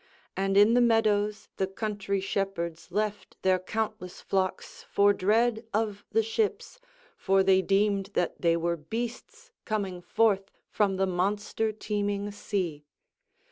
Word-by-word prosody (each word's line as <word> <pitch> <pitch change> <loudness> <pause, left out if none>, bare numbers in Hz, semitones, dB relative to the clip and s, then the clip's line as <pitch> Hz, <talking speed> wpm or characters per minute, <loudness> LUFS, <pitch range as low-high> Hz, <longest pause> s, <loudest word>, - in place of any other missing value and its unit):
And 195 0 +1
in 205 +3 +7
the 245 - +5
meadows 215 -3 +2
the 190 - 0
country 200 0 -2
shepherds 190 -4 -3
left 210 +1 -3
their 185 -1 +3
countless 215 -1 -4
flocks 190 -1 -2
for 205 0 +4
dread 220 +4 +2
of 210 -2 -1
the 225 0 +3
ships, 425 - -2 0.4
for 195 0 +2
they 190 0 +4
deemed 195 +1 +1
that 175 - -1
they 170 -1 +3
were 170 0 -1
beasts 240 - -6
coming 195 -5 -3
forth 200 0 +1 0.2
from 200 -3 +1
the 190 +1 +1
monster 205 +4 -1
teeming 205 -1 -2
sea. 185 -7 -3
200 Hz, 135 wpm, -28 LUFS, 190-215 Hz, 0.4 s, in